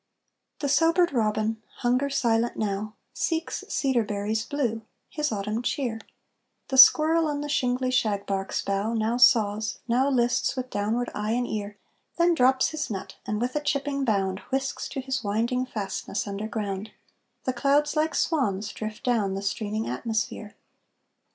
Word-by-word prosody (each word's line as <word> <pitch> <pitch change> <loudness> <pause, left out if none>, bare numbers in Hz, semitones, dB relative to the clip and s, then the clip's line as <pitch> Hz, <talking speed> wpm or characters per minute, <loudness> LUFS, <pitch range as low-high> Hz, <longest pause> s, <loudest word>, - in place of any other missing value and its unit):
The 285 - 0
sobered 330 +3 +3
robin, 220 -1 0 0.2
hunger 255 +3 +2
silent 235 -3 +1
now, 210 0 -2 0.2
Seeks 325 -1 -2
cedar 265 -4 +1
berries 210 +1 -2
blue, 240 -5 -2 0.3
his 300 -3 -1
autumn 210 +2 -2
cheer; 245 -4 -2 0.7
The 265 - -1
squirrel 315 +4 +7
on 290 -1 -2
the 295 - -4
shingly 255 -3 0
shagbark's 200 -5 -1
bough, 200 +3 -1
Now 225 +2 0
saws, 220 -4 +4
now 255 +4 +2
lists 245 0 +1
with 255 -1 -4
downward 220 +4 -1
eye 210 +1 -1
and 245 +1 0
ear, 205 -1 -4 0.4
Then 345 0 +4
drops 260 -3 +3
his 310 -1 -4
nut, 195 -3 -6
and, 210 0 -1
with 245 +3 -2
a 300 - +1
chipping 280 -1 -1
bound, 195 -5 0
Whisks 270 0 -2
to 270 - -4
his 265 -1 -3
winding 235 +5 0
fastness 200 -3 -3
underground; 205 0 -4 0.5
The 255 - -1
clouds 285 +4 +2
like 310 +1 +1
swans 210 - 0
drift 215 0 -6
down 215 -6 +1
the 195 - -4
streaming 215 +2 -2
atmosphere. 220 -2 -3
235 Hz, 150 wpm, -26 LUFS, 210-270 Hz, 0.7 s, squirrel